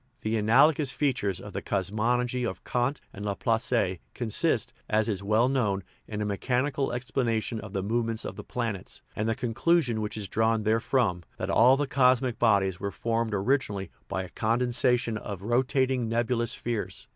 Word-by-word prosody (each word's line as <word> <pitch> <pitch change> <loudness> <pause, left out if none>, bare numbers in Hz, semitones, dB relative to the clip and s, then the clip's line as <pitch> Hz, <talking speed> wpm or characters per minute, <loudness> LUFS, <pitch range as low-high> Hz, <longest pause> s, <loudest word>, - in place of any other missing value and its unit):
The 110 - -2
analo 115 +8 +5
gous 150 -2 -2
features 110 -11 0
of 100 +1 -9
the - - -3
cosmogony 120 +6 0
of 120 - -4
Kant 125 +4 0
and 100 - -7
Laplace 105 -2 0 0.2
consist, 115 -4 +1 0.2
as 110 0 +2
is 100 -4 -1
well 110 +4 +3
known, 105 -8 0 0.2
in 105 -1 -4
a - - -2
mechanical 130 +7 0
explana 120 -2 -1
tion 110 +1 -4
of 105 -2 -9
the 95 -2 -1
movements 115 +1 -1
of - - -5
the - - -8
planets, 115 -7 -4
and 110 +1 -1
the 115 - +1
conclu 135 +7 +2
sion 115 -4 -2
which 105 0 -4
is 105 -2 -3
drawn 110 +1 +1
therefrom, 110 -3 +1 0.2
that - - -2
all 125 +4 +6
the 145 - 0
cosmic 130 -3 +2
bodies 100 -5 +3
were 100 - -2
formed 115 +1 -1
originally 100 -4 0 0.2
by 95 - -2
a 90 - -9
condensation 120 +1 +1
of 100 -3 -7
rotating 125 +1 +1
nebulous 120 0 0
spheres. 115 -3 -4
115 Hz, 175 wpm, -28 LUFS, 105-125 Hz, 0.2 s, all